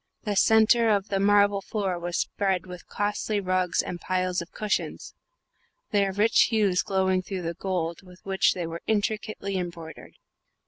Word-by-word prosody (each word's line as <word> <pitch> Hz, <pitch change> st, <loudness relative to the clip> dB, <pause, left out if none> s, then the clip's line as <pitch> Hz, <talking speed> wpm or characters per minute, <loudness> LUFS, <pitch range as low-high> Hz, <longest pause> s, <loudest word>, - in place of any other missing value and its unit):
The 210 Hz, -2 st, -2 dB
centre 220 Hz, +3 st, +4 dB
of 205 Hz, -1 st, +1 dB
the 195 Hz, -, 0 dB
marble 205 Hz, 0 st, +4 dB
floor 195 Hz, -4 st, -2 dB
was 175 Hz, 0 st, -3 dB
spread 190 Hz, -3 st, -1 dB
with 180 Hz, -1 st, -10 dB
costly 205 Hz, +1 st, -1 dB
rugs 185 Hz, -2 st, 0 dB
and 175 Hz, -1 st, -6 dB
piles 185 Hz, -1 st, -1 dB
of 170 Hz, -, -9 dB
cushions, 215 Hz, -1 st, -3 dB, 0.8 s
their 200 Hz, -2 st, +2 dB
rich 210 Hz, +4 st, +4 dB
hues 205 Hz, -6 st, +2 dB
glowing 190 Hz, -1 st, +1 dB
through 185 Hz, -1 st, -5 dB
the 165 Hz, 0 st, -3 dB
gold 170 Hz, -2 st, -3 dB
with 180 Hz, -1 st, -16 dB
which 190 Hz, -1 st, +2 dB
they 175 Hz, -2 st, -3 dB
were 165 Hz, +1 st, -6 dB
intricately 215 Hz, -2 st, -1 dB
embroidered. 170 Hz, -3 st, -7 dB
190 Hz, 155 wpm, -26 LUFS, 180-205 Hz, 0.8 s, centre